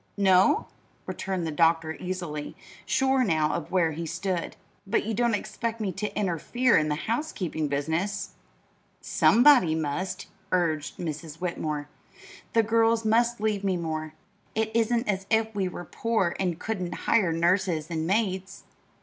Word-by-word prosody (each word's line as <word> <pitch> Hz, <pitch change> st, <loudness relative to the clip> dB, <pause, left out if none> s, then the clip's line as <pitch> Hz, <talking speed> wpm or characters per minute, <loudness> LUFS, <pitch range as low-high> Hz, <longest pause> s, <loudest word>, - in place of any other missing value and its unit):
"No?" 190 Hz, -2 st, +4 dB, 0.4 s
returned 190 Hz, -3 st, -3 dB
the 160 Hz, -, -2 dB
doctor 160 Hz, 0 st, +2 dB
easily, 175 Hz, -5 st, -5 dB, 0.3 s
sure 265 Hz, 0 st, +2 dB
now 155 Hz, -7 st, +1 dB
of 170 Hz, -, -4 dB
where 175 Hz, -3 st, +2 dB
he 165 Hz, +2 st, -5 dB
stood. 185 Hz, +1 st, -3 dB, 0.3 s
"But 195 Hz, -, +1 dB
you 225 Hz, -, -2 dB
don't 235 Hz, +1 st, +2 dB
expect 225 Hz, +2 st, -4 dB
me 205 Hz, -3 st, -1 dB
to 210 Hz, +4 st, -4 dB
interfere 210 Hz, +6 st, +1 dB
in 155 Hz, 0 st, +3 dB
this 150 Hz, +2 st, -2 dB
housekeeping 210 Hz, -, -2 dB
business!" 165 Hz, +8 st, -2 dB, 0.7 s
"Somebody 240 Hz, -, +5 dB
must," 165 Hz, +5 st, -3 dB, 0.3 s
urged 160 Hz, -5 st, 0 dB
Mrs. 155 Hz, -2 st, -5 dB
Whitmore. 155 Hz, -4 st, -3 dB, 0.7 s
"The 230 Hz, -, +4 dB
girls 225 Hz, +1 st, +2 dB
must 235 Hz, +2 st, +2 dB
leave 210 Hz, -2 st, 0 dB
me 190 Hz, -2 st, +1 dB
more. 155 Hz, -2 st, -4 dB, 0.4 s
It 220 Hz, 0 st, 0 dB
isn't 230 Hz, +1 st, +2 dB
as 195 Hz, -1 st, -1 dB
if 220 Hz, 0 st, +2 dB
we 195 Hz, -3 st, 0 dB
were 175 Hz, -1 st, -7 dB
poor 215 Hz, -3 st, 0 dB
and 180 Hz, -4 st, 0 dB
couldn't 185 Hz, -6 st, -4 dB
hire 195 Hz, -7 st, +3 dB
nurses 170 Hz, -1 st, +1 dB
and 160 Hz, -1 st, -2 dB
maids. 195 Hz, -1 st, -1 dB
185 Hz, 145 wpm, -27 LUFS, 160-220 Hz, 0.7 s, Somebody